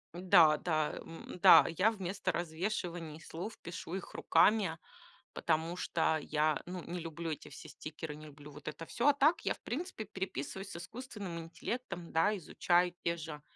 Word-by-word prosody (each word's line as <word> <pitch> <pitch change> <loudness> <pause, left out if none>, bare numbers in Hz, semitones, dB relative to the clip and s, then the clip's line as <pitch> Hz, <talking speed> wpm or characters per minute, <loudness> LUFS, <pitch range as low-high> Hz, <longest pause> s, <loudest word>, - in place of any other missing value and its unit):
Да, 175 -4 +6
да, 155 -2 0
м, 165 +2 -9
да, 160 -4 +10
я 200 +4 +5
вместо 195 -3 -2
развешивания 170 -2 -3
слов 180 +7 -7
пишу 170 0 -6
их 190 - -6
руками, 200 -7 +3 0.6
потому 165 +1 0
что 160 -3 +1
я, 150 0 +1
ну, 180 -1 -5
не 175 +1 -5
люблю 165 0 -4
эти 155 - -6
все - - -10
стикеры, 155 0 -7
не 155 +1 -11
люблю 145 0 -12
вот 145 +1 -12
это 155 +2 -5
всё. 240 - 0
А 290 - +7
так 290 +4 +4
я, - - 0
в - - -24
принципе, 305 -4 -4
переписываюсь 190 -2 -5
с - - -8
искусственным 200 -2 -6
интеллектом, 175 +2 -5
да, 200 +6 +3
изучаю 175 +1 +2
те 170 0 0
же 150 -2 -7
170 Hz, 170 wpm, -33 LUFS, 160-195 Hz, 0.6 s, да